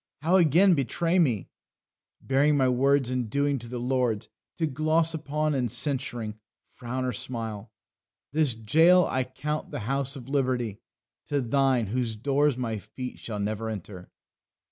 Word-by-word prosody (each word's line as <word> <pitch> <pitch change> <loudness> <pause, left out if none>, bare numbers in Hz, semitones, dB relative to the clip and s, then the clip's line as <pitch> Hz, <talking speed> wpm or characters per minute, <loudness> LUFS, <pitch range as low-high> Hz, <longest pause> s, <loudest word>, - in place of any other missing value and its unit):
How 170 +5 +4
again 175 +3 +5
betray 165 +5 +1
me, 120 - +1 0.7
Bearing 145 +2 +2
my 130 -2 +3
words 130 +1 +2
and 125 -3 -1
doings 140 +1 0
to 120 - -9
the 125 +1 -5
lords 120 -3 -1 0.3
To 165 - +1
gloss 155 +3 +1
upon, 155 0 -1
and 125 -5 -1
censuring, 120 -5 -2 0.3
frown 130 +1 -4
or 125 - -1
smile! 115 -4 -5 0.6
This 150 -5 +1
jail 165 +11 +5
I 130 - 0
count 150 +4 -4
the - - -5
house 135 +4 -1
of 130 -3 -9
liberty 125 -6 -1 0.5
To 145 - 0
thine, 130 -1 +2
whose 115 +1 -2
doors 140 +4 +1
my 115 -4 -2
feet 125 +5 -8
shall 110 -3 -5
never 110 +2 -2
enter." 95 -3 -7
130 Hz, 150 wpm, -27 LUFS, 115-145 Hz, 0.7 s, again